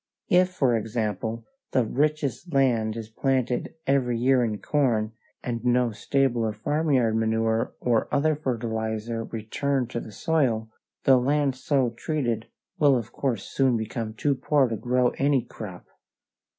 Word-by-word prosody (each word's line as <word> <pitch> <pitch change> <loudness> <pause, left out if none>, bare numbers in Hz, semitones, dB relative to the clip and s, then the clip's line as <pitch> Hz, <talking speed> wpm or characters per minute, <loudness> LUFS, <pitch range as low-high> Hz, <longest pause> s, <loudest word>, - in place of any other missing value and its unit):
If, 180 +1 +5
for 135 -9 +2
example, 110 0 -2 0.3
the 125 - +3
richest 150 +5 -1
land 115 -6 +2
is 110 -2 -6
planted 125 +3 -1
every 130 -3 +2
year 125 +1 +3
in 110 -3 -1
corn, 115 -2 +1 0.3
and 115 -2 -3
no 125 -1 +2
stable 130 +2 +1
or 110 -1 0
farmyard 130 -1 +1
manure 110 0 0
or 120 -3 +1
other 155 +2 +2
fertilizer 115 -4 -3
returned 125 +3 -2
to 120 - -2
the 110 - -9
soil, 115 -3 0 0.3
the 135 -1 +6
land 140 +1 +1
so 130 -2 +1
treated 120 -3 -2 0.3
will 140 -3 +5
of 115 -3 -5
course 120 -8 -1
soon 130 -3 +1
become 110 0 -4
too 145 +5 +1
poor 140 0 +2
to 115 - -1
grow 125 +3 +2
any 140 -3 +3
crop. 95 -5 -9
120 Hz, 145 wpm, -26 LUFS, 110-135 Hz, 0.3 s, the